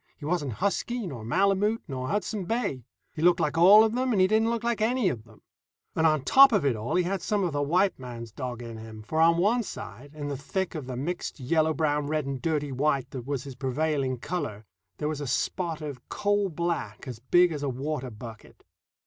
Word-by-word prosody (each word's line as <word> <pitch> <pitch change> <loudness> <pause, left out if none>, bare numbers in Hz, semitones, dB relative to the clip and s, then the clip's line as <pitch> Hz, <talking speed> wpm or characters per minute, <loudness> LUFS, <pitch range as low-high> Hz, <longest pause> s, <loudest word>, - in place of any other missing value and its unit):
He 145 - -9
wasn't 150 -6 -1
husky, 210 - -1
nor 130 -10 -6
Malemute, 200 - +1
nor 130 -3 -4
Hudson 205 - -2
Bay; 200 - -2 0.3
he 155 - -6
looked 175 +1 +5
like 155 -2 0
all 195 +6 +8
of 220 0 +1
them 255 +1 0
and 210 - +2
he 185 - +6
didn't 220 +3 +2
look 235 -1 -2
like 235 -2 0
any 230 -2 +2
of 115 -7 -5
them; 110 -2 -20 0.5
and 160 0 +4
on 155 -3 +2
top 270 - +7
of 205 -9 +2
it 135 -4 +2
all 110 +2 -3
he 180 - +3
had 190 +1 -2
some 205 +1 0
of 175 -4 -1
the 145 - 0
white 180 +6 +2
man's 120 -3 -8
dog 120 0 -5
in 115 -1 -7
him, 110 -1 -10
for 155 +8 0
on 165 +1 +5
one 215 +8 +3
side, 145 - -9
in 145 -1 -5
the 145 - -3
thick 185 +7 -3
of 150 -6 -6
the 130 - -4
mixed 170 +4 -4
yellow 155 +4 +2
brown 150 -2 0
red 155 -1 -1
and 135 -2 -4
dirty 150 -3 -1
white 135 -1 0
that 130 -2 -7
was 140 -3 -2
his 140 - -8
prevailing 135 0 -1
color, 120 - -4 0.3
there 150 - -2
was 150 -1 -3
a 145 - -4
spot 165 +5 -1
of 145 -5 -7
coal 205 -1 +1
black 165 - -3
as 125 -4 -6
big 175 +8 +4
as 150 -3 -4
a 145 - -1
water 135 +1 -3
bucket. 110 -1 -11
155 Hz, 225 wpm, -27 LUFS, 130-185 Hz, 0.5 s, all